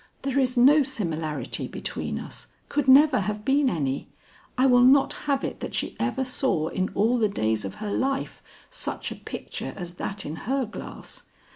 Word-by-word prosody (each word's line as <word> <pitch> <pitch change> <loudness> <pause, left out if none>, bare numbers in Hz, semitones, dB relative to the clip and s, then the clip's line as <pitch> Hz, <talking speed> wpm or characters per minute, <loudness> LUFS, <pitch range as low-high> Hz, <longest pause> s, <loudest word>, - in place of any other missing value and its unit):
There 275 0 +1
is 255 -1 +1
no 280 +5 +7
similarity 165 - -2
between - - -4
us, - - -7 0.2
could 285 -2 0
never 275 0 +7
have 210 +1 -3
been 275 0 +3
any: 140 - -2 0.5
I 255 - +4
will 245 -2 +6
not 270 +2 +5 0.2
have 275 -1 +2
it - - -4
that - - -5
she - - -2
ever 265 -1 0
saw 250 - 0
in 185 0 -1
all 230 +5 +3
the 215 -2 +3
days 110 - 0
of 95 - -6
her 210 -1 -5
life 270 +5 -1 0.3
such - - -3
a - - -5
picture - - -6
as 175 -3 -7
that 195 0 -4
in 155 +2 -5
her 270 0 +1
glass." 225 - -8
245 Hz, 180 wpm, -26 LUFS, 185-270 Hz, 0.5 s, no